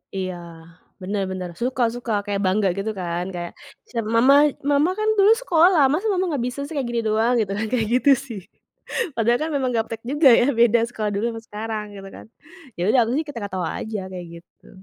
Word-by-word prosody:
Iya, 185 -1 -3 0.7
bener 200 +2 -2
bener 185 -1 -5
suka 250 0 0
suka 245 -1 -5
kayak 200 -1 -2
bangga 195 +2 +2
gitu 215 +2 -2
kan 175 0 -3
kayak 175 0 -5 0.4
sem 230 -2 -2
"Mama 255 +4 +6 0.4
Mama 290 +5 +3
kan 430 - 0
dulu 405 +2 +6
sekolah 345 -5 +4
masa 375 +9 0
Mama 370 0 0
nggak 265 -5 -1
bisa 250 +3 -6
sih 290 - -7
kayak 255 - -2
gini 235 -1 -1
doang" 220 +3 +2
gitu 200 -3 -1
kan 220 - -1
kayak 230 -3 +1
gitu 275 +3 +4 0.2
sih, 220 -5 -6 0.8
padahal 235 +2 +2
kan - - -4
memang 260 -2 0
gaptek 225 0 -3
juga 295 -1 +5
ya, 245 - +3
beda 235 0 +5
sekolah 215 -3 -3
dulu 205 +3 -1
sama 225 0 -7
sekarang 215 0 -5
gitu 195 0 -9
kan, - - -12 0.5
ya 175 - -4
udah 260 - +3
aku - - -3
sih - - 0
ketawa-ketawa 200 - -4
aja 215 -2 -4
kayak 180 -1 -7 0.2
gitu. - - -25
225 Hz, 200 wpm, -22 LUFS, 200-260 Hz, 0.8 s, Mama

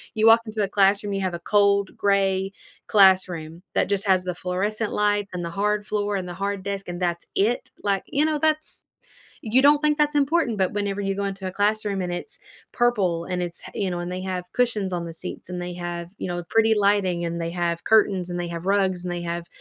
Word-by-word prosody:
you 220 0 +3
walk 225 +1 +8
into 215 -1 -3
a 195 - -1
classroom, 200 +1 +2
you 195 - -1
have 185 -2 -1
a - - -6
cold 200 +1 +2
gray 195 -1 +1 0.4
classroom 185 -4 +3
that - - +2
just 200 0 0
has 185 -1 +4
the 180 -1 -3
fluorescent 205 +5 -2
lights 205 -1 +1
and 180 -1 -3
the 170 - -5
hard 210 0 0
floor 205 -1 -1
and 185 -1 -4
the 175 - -6
hard 200 +1 -2
desk, 200 0 -4
and 175 +1 -5
that's 170 -1 -1
it? 220 +5 0
Like, 200 -2 0
you 285 - +1
know, 310 -1 +1
that's 310 0 -1 0.6
you 235 +3 +3
don't 290 +1 +6
think 300 0 +2
that's 295 0 +2
important, 285 -4 +2
but 190 -1 +1
whenever 205 -1 -2
you 195 -1 -1
go 200 - -2
into 195 -1 -4
a - - -7
classroom 205 0 0
and 180 -1 -3
it's 175 - -6 0.3
purple 195 -9 +1
and 180 -1 -2
it's 175 -1 -5
h - - -15
you 195 -2 -1
know, 175 - -3
and 175 +1 -4
they 185 0 -4
have 185 -1 -3
cushions 215 -6 0
on 175 -1 -2
the 165 - -6
seats - - -8
and 180 0 -4
they 175 0 -5
have, 175 -1 -5
you - - -4
know, 175 0 -3
pretty 225 0 +4
lighting 200 -4 +2
and 170 0 -3
they 165 0 -2
have 170 -1 -2
curtains 195 -5 +3
and 175 - -3
they 175 - -2
have 170 +1 -6
rugs 190 -2 +1
and 180 - -3
they 175 0 -4
have, 170 0 -4
195 Hz, 235 wpm, -24 LUFS, 180-210 Hz, 0.6 s, walk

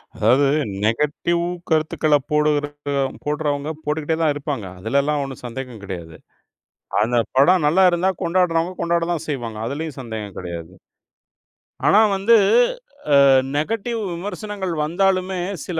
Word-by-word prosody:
அதாவது 125 +6 +3 0.4
நெகடிவ் 150 +9 0 0.3
கருத்துக்கள 155 -1 +2 0.2
போடுவதற்கு 145 -1 0 0.3
போடுறவங்க 145 -1 -1 0.2
போட்டுகிட்டே 155 +1 -1
தான் 155 -2 +3
இருப்பாங்க. 140 -7 -4
அதுலலாம் 140 +8 0
ஒண்ணும் 135 -2 -8
சந்தேகம் 125 -2 -7
கிடையாது. 85 -5 -7 0.9
அந்தப் 115 +1 +1
படம் 160 +5 +5
நல்லா 185 +6 +4
இருந்தா, 175 +2 +1
கொண்டாடுறவங்க 170 0 +1
கொண்டாடுதான் 170 -1 0
செய்வாங்க. 120 -6 -4
அதுலயும் 150 +2 -5
சந்தேகம் 110 -5 -7
கிடையாது. 85 -1 -7 1.2
ஆனா 210 - +6 0.2
வந்து, 205 +5 +4 0.9
ஆ - - +6 0.3
நெகடிவ் 225 +8 -2
விமர்சனங்கள் 200 +1 -5
வந்தாலுமே 185 +2 0 0.3
சில 170 -3 -3
150 Hz, 110 wpm, -21 LUFS, 130-175 Hz, 1.2 s, ஆனா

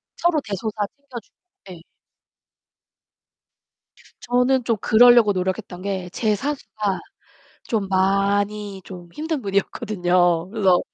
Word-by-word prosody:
서로 345 -3 +1
대소사 210 +1 -3
챙겨주고 275 -6 -12 0.4
예. 175 -2 -11 2.4
저는 250 +1 +2
좀 230 -2 0
그러려고 240 -1 +6
노력했던 185 0 -3
게 190 -2 -4
제 215 +2 0
사수가 215 -6 -3 0.6
좀 215 -5 -2
많이 200 +1 0
좀 180 -2 -10
힘든 315 -1 -3
분이었거든요. 180 -4 0
그래서 195 -4 +3
205 Hz, 225 characters per minute, -22 LUFS, 190-235 Hz, 2.4 s, 그러려고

